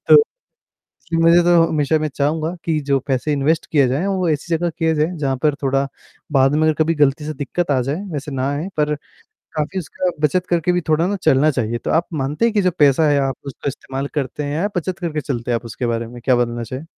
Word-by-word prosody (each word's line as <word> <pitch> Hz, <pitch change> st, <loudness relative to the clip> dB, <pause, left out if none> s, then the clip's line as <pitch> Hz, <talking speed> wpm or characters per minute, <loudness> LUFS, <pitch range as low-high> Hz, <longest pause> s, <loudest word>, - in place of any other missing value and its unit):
तो, 445 Hz, -, +9 dB, 1.0 s
मुझे 170 Hz, +1 st, +6 dB
तो 175 Hz, -1 st, +5 dB
हमेशा 150 Hz, 0 st, +1 dB
मैं 155 Hz, 0 st, -1 dB
चाहूँगा 155 Hz, +4 st, 0 dB
कि 160 Hz, -2 st, +1 dB
जो 140 Hz, -1 st, +3 dB
पैसे 135 Hz, +2 st, 0 dB
इन्वेस्ट 145 Hz, +3 st, +1 dB
किए 140 Hz, -4 st, +4 dB
जाए 135 Hz, +9 st, 0 dB
वो 185 Hz, -3 st, 0 dB
ऐसी 155 Hz, +2 st, -1 dB
जगह 170 Hz, +2 st, 0 dB
किया 165 Hz, 0 st, 0 dB
जाए 155 Hz, 0 st, +2 dB
जहाँ 135 Hz, -3 st, -1 dB
पर 150 Hz, -2 st, +3 dB
थोड़ा 135 Hz, 0 st, +1 dB, 0.4 s
बाद 135 Hz, 0 st, +4 dB
में 155 Hz, -, +2 dB
अगर 155 Hz, 0 st, +3 dB
कभी 165 Hz, +1 st, 0 dB
गलती 150 Hz, 0 st, +2 dB
से 155 Hz, -, -3 dB
दिक्कत 150 Hz, +3 st, -2 dB
आ 135 Hz, -, +3 dB
जाए 140 Hz, +8 st, -2 dB
वैसे 145 Hz, 0 st, -4 dB
ना 135 Hz, 0 st, -1 dB
आए 150 Hz, +6 st, -3 dB
पर 150 Hz, 0 st, +1 dB, 0.6 s
काफ़ी 155 Hz, +5 st, -2 dB
उसका 180 Hz, +2 st, -2 dB, 0.2 s
बचत 180 Hz, +5 st, -1 dB
करके 175 Hz, 0 st, +2 dB
भी 180 Hz, -, +1 dB
थोड़ा 160 Hz, +2 st, +3 dB
ना 200 Hz, +2 st, -1 dB
चलना 140 Hz, +4 st, +4 dB
चाहिए। 120 Hz, -4 st, -1 dB
तो -, -, -4 dB
आप 165 Hz, +2 st, +2 dB, 0.2 s
मानते 145 Hz, +11 st, -1 dB
हैं 230 Hz, -1 st, +2 dB
कि 205 Hz, -, +3 dB
जो 185 Hz, -, +3 dB
पैसा 145 Hz, +1 st, +5 dB
है 145 Hz, -, +3 dB
आप 135 Hz, -2 st, -1 dB
उसका 140 Hz, +1 st, -5 dB
इस्तेमाल 135 Hz, 0 st, -5 dB
करते 145 Hz, 0 st, -2 dB
हैं 145 Hz, 0 st, -3 dB
या 190 Hz, +6 st, 0 dB
बचत 180 Hz, +2 st, -2 dB
करके 165 Hz, -4 st, -2 dB
चलते 125 Hz, -5 st, -4 dB
हैं 120 Hz, -, +2 dB
आप 115 Hz, -, -6 dB
उसके 115 Hz, +2 st, -4 dB
बारे 115 Hz, 0 st, -1 dB
में 120 Hz, +1 st, -10 dB
क्या 130 Hz, -2 st, +4 dB
बदलना 120 Hz, -1 st, -1 dB
चाहे? 130 Hz, +6 st, -6 dB
150 Hz, 235 wpm, -20 LUFS, 135-165 Hz, 1.0 s, तो